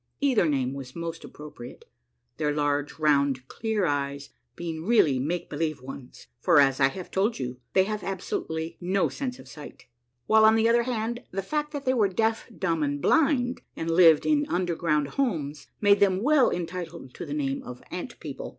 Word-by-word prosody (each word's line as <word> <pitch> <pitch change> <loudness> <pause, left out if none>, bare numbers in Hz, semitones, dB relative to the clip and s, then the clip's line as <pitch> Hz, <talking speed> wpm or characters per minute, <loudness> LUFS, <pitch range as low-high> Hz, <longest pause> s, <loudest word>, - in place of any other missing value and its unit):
Either 260 - +3
name 135 -2 0
was 135 -2 -8
most 165 -1 -5
appropriate, 145 -5 -11 0.5
their 150 -2 0
large, 145 -1 -1
round, 140 -4 +2
clear 220 - -1
eyes 140 -2 -2 0.2
being 165 -2 -5
really 170 - +3
make 165 +6 -2
believe 155 -3 -2
ones, 130 0 -10
for, 145 - +5
as 135 -1 +4
I 135 - +6
have 180 +6 -7
told 205 +5 +1
you, 125 -1 -5
they 190 - +5
had 210 +1 -3
absolutely 165 -3 -4
no 185 +2 +1
sense 255 -3 -4
of - - -14
sight; 150 -2 -11 0.4
while 220 0 +5
on 220 0 +7
the 225 0 +3
other 235 +1 +4
hand, 235 0 -2
the 195 +1 -4
fact 300 +7 -2
that 285 -1 -5
they 260 - +3
were 215 -6 +3
deaf, 220 +4 0
dumb, 165 -4 0
and 145 -1 -1
blind, 260 - +2
and 165 0 -3
lived 165 -3 +6
in 295 -1 +2
underground 170 -4 0
homes, 150 - -2
made 205 -1 +5
them 195 0 +3
well 290 -1 +5
entitled 170 -6 -5
to - - -7
the 145 -2 -5
name 140 -2 -1
of 125 0 -10
Ant - - -6
People. - - -7
170 Hz, 185 wpm, -26 LUFS, 145-220 Hz, 0.5 s, on